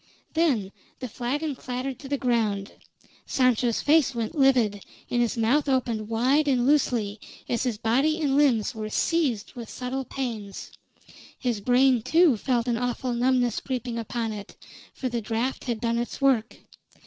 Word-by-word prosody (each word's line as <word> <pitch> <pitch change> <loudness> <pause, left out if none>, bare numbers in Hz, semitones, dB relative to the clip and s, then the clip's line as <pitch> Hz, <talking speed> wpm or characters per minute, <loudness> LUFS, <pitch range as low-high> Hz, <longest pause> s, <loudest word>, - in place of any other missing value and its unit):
Then 270 - +1 0.3
the 255 - -5
flagon 275 +6 -3
clattered 255 +1 -5
to 270 - -9
the 280 - 0
ground, 220 -6 0 0.6
Sancho's 250 -2 +2
face 290 -3 +3
went 230 -2 -2
livid, 250 - +3 0.3
and 240 - +2
his 240 0 0
mouth 275 +6 +2
opened 235 -5 0
wide 260 +7 +2
and 250 -3 +2
loosely, 235 -7 +1 0.3
as 235 - -1
his 245 -5 -1
body 270 +9 +1
and 285 -4 +1
limbs 260 -8 +3
were 215 -1 -5
seized 260 -5 0
with 235 -4 -8
subtle 260 +1 -4
pains. 225 -8 -5 0.7
His 240 -5 -2
brain, 250 +1 +4
too, 325 +2 +4
felt 240 +2 -1
an 235 -1 +1
awful 245 +1 -2
numbness 245 0 +1
creeping 245 -3 -4
upon 230 0 -3
it; 205 -1 -9 0.4
for 260 - -4
the 235 -2 -2
draft 230 +4 -2
had 235 -3 -2
done 235 0 0
its 240 - -4
work. 265 -5 +2
245 Hz, 160 wpm, -26 LUFS, 225-270 Hz, 0.7 s, brain